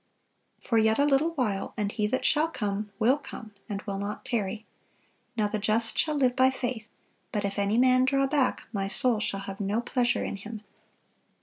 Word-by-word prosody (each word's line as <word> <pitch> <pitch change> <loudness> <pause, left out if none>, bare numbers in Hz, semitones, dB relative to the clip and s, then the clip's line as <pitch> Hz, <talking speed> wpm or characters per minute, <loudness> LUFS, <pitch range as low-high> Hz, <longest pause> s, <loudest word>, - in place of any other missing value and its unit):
For 230 -3 +2
yet 220 0 +3
a 285 - +4
little 295 +4 +2
while, 210 -8 -1
and 205 -2 -1
He 210 -1 0
that 260 +5 -1
shall 305 +2 +3
come 210 -8 -3
will 250 +7 +3
come, 225 -6 -9 0.2
and 205 -1 -4
will 195 -2 -4
not 205 +1 -5
tarry. 215 -1 -2 0.7
Now 210 -2 +2
the 215 +1 -2
just 220 +2 0
shall 305 -1 +1
live 255 -3 +2
by 260 0 +5
faith: 245 -4 -4 0.4
but 210 -2 -1
if 200 0 -2
any 200 +2 +1
man 255 +1 +5
draw 275 +1 +2
back, 270 -1 +1
My 195 -2 -1
soul 235 +2 +2
shall 195 -2 -2
have 195 0 -7
no 200 +3 0
pleasure 240 0 0
in - - -3
him. 215 +2 -8
220 Hz, 195 wpm, -28 LUFS, 205-255 Hz, 0.7 s, by